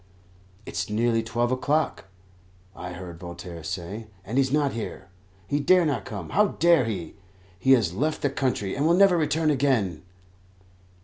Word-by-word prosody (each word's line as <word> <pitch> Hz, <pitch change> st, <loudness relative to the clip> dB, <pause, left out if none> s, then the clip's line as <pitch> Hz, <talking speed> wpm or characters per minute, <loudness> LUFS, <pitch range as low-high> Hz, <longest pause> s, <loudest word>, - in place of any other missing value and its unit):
"It -, -, -8 dB
is -, -, -2 dB
nearly 115 Hz, +2 st, +1 dB
twelve 120 Hz, +2 st, -1 dB
o'clock," 145 Hz, +2 st, 0 dB, 0.7 s
I 90 Hz, 0 st, -7 dB
heard 85 Hz, -1 st, -9 dB
Voltaire 85 Hz, -1 st, -8 dB
say, 95 Hz, +5 st, -5 dB, 0.2 s
"and 120 Hz, +6 st, 0 dB
he's 130 Hz, -1 st, +2 dB
not 145 Hz, -1 st, +1 dB
here. 110 Hz, -3 st, -6 dB, 0.4 s
He 145 Hz, +8 st, -1 dB
dare 180 Hz, +4 st, +4 dB
not 145 Hz, -4 st, -1 dB
come; 100 Hz, -6 st, -7 dB
how 210 Hz, +1 st, +4 dB
dare 170 Hz, -6 st, +5 dB
he? 95 Hz, -8 st, -4 dB, 0.5 s
He 135 Hz, +6 st, +5 dB
has 110 Hz, -10 st, +2 dB
left 155 Hz, +10 st, -1 dB
the 145 Hz, -, +2 dB
country, 125 Hz, -8 st, -1 dB
and 145 Hz, +3 st, +1 dB
will 170 Hz, -, +5 dB
never 195 Hz, -2 st, +6 dB
return 155 Hz, -1 st, +1 dB
again." 125 Hz, -, +1 dB
120 Hz, 165 wpm, -25 LUFS, 95-150 Hz, 0.7 s, never